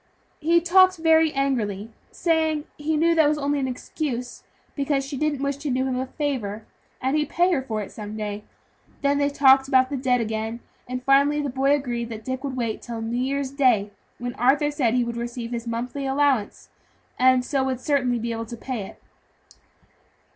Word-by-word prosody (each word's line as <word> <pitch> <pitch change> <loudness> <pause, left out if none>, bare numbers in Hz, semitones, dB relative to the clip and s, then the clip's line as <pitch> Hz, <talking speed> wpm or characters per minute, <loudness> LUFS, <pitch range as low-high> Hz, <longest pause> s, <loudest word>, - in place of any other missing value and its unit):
"He 335 +2 +4
talked 370 +2 +5
very 320 -1 +4
angrily, 230 -7 -1 0.2
saying 315 -3 0
he 305 +1 -1
knew 335 +2 +3
that 320 -2 +4
was 300 - 0
only 285 0 0
an 265 - -1
excuse, 250 -1 -4 0.3
because 275 -1 0
she 275 +1 -6
didn't 290 0 -1
wish 280 0 -1
to 290 +1 -4
do 260 0 0
him 255 -1 -1
a 260 - -3
favor, 235 -8 -3 0.3
and 265 +3 0
he'd 300 -2 0
pay 355 +2 +2
her 305 -7 +1
for 220 -5 -3
it - - -10
some 210 0 -7
day. 210 -1 -4 0.6
Then 280 0 +2
they 285 0 +2
talked 270 -1 +5
about 260 0 +3
the 280 - -1
debt 250 -1 +1
again, 220 +1 -3 0.3
and 250 0 -4
finally 280 +2 +4
the 285 -3 -2
boy 270 +2 +3
agreed 240 -4 -3
that 220 -1 -8
Dick 260 +1 -4
would 275 -2 -3
wait 230 -3 -1
until 230 -2 -7
New 235 +2 -2
Year's 275 +1 -1
Day, 245 -8 +2 0.3
when 245 0 -4
Arthur 275 +4 +3
said 255 -6 +1
he 250 - +3
would 235 0 -4
receive 235 0 -5
his 235 -1 -4
monthly 250 +4 -3
allowance, 270 -5 0 0.5
and 255 0 +4
so 275 -1 0
would 260 -2 -2
certainly 255 -3 +1
be 235 0 -3
able 230 0 -4
to 235 - -7
pay 250 -2 -4
it. - - -14
265 Hz, 200 wpm, -24 LUFS, 235-285 Hz, 0.6 s, talked